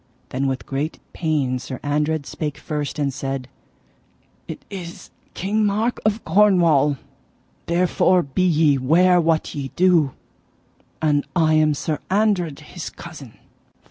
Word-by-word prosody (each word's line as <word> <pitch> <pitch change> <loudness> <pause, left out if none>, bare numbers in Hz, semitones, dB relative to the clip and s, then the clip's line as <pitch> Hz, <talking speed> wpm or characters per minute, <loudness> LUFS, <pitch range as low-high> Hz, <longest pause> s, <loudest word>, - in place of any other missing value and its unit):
Then 135 +2 -1
with 130 -1 -3
great 140 +4 -3 0.2
pain 145 -6 0
Sir 130 0 -7
Andred 150 +1 0
spake 150 0 -4
first, 150 -2 -4
and 140 -2 -1
said: 135 -1 -4 1.0
It - - -8
is 175 -3 -9 0.2
King 210 +4 0
Mark 215 +4 0
of 215 +1 0
Cornwall, 165 -7 +4 0.7
therefore 180 +1 +3
be 140 +6 -2
ye 155 -5 +3
ware 175 +7 +4
what 165 -1 0
ye 140 -2 -4
do, 170 -7 +3 0.9
and 145 -2 +2
I 160 -3 +3
am 155 -1 +3
Sir 150 +2 -2
Andred, 190 -7 +1
his 160 +2 -7
cousin. 150 -8 -11
155 Hz, 130 wpm, -22 LUFS, 140-180 Hz, 1.0 s, Cornwall